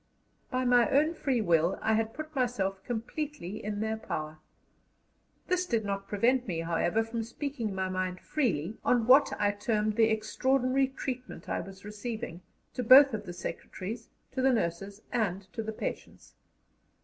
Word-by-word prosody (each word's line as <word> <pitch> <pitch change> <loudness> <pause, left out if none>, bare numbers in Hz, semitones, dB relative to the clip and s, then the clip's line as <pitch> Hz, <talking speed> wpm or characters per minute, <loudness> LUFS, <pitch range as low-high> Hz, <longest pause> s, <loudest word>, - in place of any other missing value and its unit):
By 255 0 0
my 245 +1 +5
own 300 +4 +3
free 270 -7 0
will 170 -2 +2
I 220 - +1
had 225 0 0
put 310 0 -7
myself 195 -7 -1
completely 240 - -4
in 205 0 -3
their 220 0 -1
power. 155 -7 -5 1.1
This 365 0 0
did 230 -6 0
not 195 0 -3
prevent 240 +5 +2
me, 165 -4 -2
however, 170 +6 +1
from 225 +1 -3
speaking 235 -2 -4
my 190 0 -1
mind 185 0 -2
freely 210 - -1
on 240 -2 +3
what 270 +4 +6
I 205 -1 +3
termed 210 +1 -1
"the 225 -1 +5
extraordinary 255 +4 +1
treatment 260 -1 -6
I - - -1
was 195 0 -11
receiving," 210 -3 -5 0.3
to - - -2
both 265 +3 +8
of 210 -2 -4
the 175 - -5
secretaries, 200 +5 -6 0.2
to 260 - -2
the 265 +1 +4
nurses, 195 -1 -2
and 200 -5 0
to 225 - -3
the 220 0 -4
patients. 215 - -6
220 Hz, 160 wpm, -30 LUFS, 195-255 Hz, 1.1 s, both